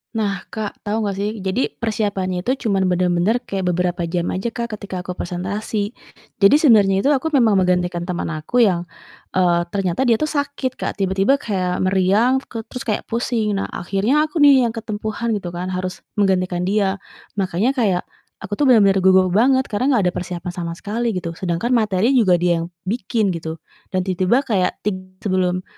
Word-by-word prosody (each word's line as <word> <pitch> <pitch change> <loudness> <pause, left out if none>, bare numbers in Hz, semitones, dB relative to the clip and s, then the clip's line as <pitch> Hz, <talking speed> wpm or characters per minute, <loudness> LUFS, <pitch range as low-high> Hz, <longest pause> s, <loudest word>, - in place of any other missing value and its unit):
Nah, 200 -4 -1
Kak, 215 -2 -5
tahu 215 +1 -1
enggak 195 - -2
sih, 210 - -1
jadi 195 +6 -1
persiapannya 200 -5 -2
itu 255 -1 -1
cuman 195 -2 +2
bener-bener 180 +5 +2
kayak 195 -1 -2
beberapa 175 0 -1
jam 170 +1 -2
aja, 195 +5 -2
Kak, 235 -2 -4
ketika 195 -3 -6
aku 180 0 -6
presentasi. 200 +5 -3 0.4
Jadi 200 +7 +5
sebenarnya 205 -9 +5
itu, 270 - 0
aku 295 +2 +1
memang 235 -7 +4
menggantikan 180 -2 +1
teman 180 0 -3
aku 165 +10 -2
yang, 180 -7 +3 0.5
eee, 175 -2 +2
ternyata 195 +3 0
dia 230 -3 +3
tuh 305 - 0
sakit, 285 -3 -2
Kak, - - -5
tiba-tiba 195 +8 +2
kayak 185 -6 -2
meriang 195 +8 +2
ke 230 - -7
terus 250 +1 -7
kayak 215 -4 -2
pusing, 225 -3 -1
nah 195 - -3
akhirnya 220 - +1
aku 305 -1 +1
nih 265 -4 +6
yang 230 - -5
ketempuhan 220 +1 -3
gitu 200 -4 -2
kan 175 +2 -4
harus 185 0 -4 0.2
menggantikan 185 -2 +1
dia, 195 -1 +1 0.4
makanya 190 +6 +1
kayak, 210 -9 +1 0.4
aku 190 - -8
tuh 285 - +3
bener-bener 200 -6 +5
gugup 185 -1 +4
banget, 260 +6 +4
karena 255 +6 +1
enggak 210 - +2
ada - - -29
persiapan 180 0 -5
sama 170 -1 -5
sekali 225 +3 -2
gitu 170 -2 -3
sedangkan 180 +6 -1
materi 215 0 +2
juga 220 -9 +4
dia 175 -1 +1
yang 165 - -4 0.2
bikin 210 0 -1
gitu, 160 -1 -5 0.4
dan 185 - +1
tiba-tiba 190 +8 +1
kayak 200 -8 +1
tig 185 -2 -4
sebelum, 185 -2 0
195 Hz, 180 wpm, -20 LUFS, 180-230 Hz, 0.5 s, nih